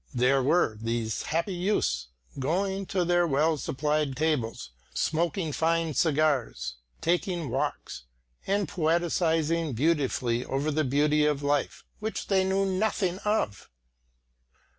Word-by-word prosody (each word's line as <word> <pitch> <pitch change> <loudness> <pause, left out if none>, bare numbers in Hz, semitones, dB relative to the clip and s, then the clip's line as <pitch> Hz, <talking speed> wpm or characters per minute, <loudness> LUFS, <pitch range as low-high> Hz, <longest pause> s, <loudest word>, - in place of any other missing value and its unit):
There 130 +2 +3
were 130 -6 +2
these 115 -1 -2
happy 170 +5 -1
youths 175 - 0 0.3
going 190 +7 -1
to 185 -2 0
their 175 0 +3
well 155 +2 +2
supplied 150 +1 -1
tables, 140 - -1 0.2
smoking 165 0 0
fine 165 0 +1
cigars, 140 - +1 0.2
taking 175 - 0
walks, - - -3 0.4
and 200 -1 +1
poetising 165 -1 +1
beautifully 130 -4 +1
over 140 +4 -1
the 155 +1 +1
beauty 150 +2 +2
of 145 -1 0
life 145 0 -1
which 220 +1 -4
they 190 -2 +3
knew 190 +1 +1
nothing 190 -1 0
of. 210 - -1
155 Hz, 120 wpm, -28 LUFS, 135-175 Hz, 0.4 s, There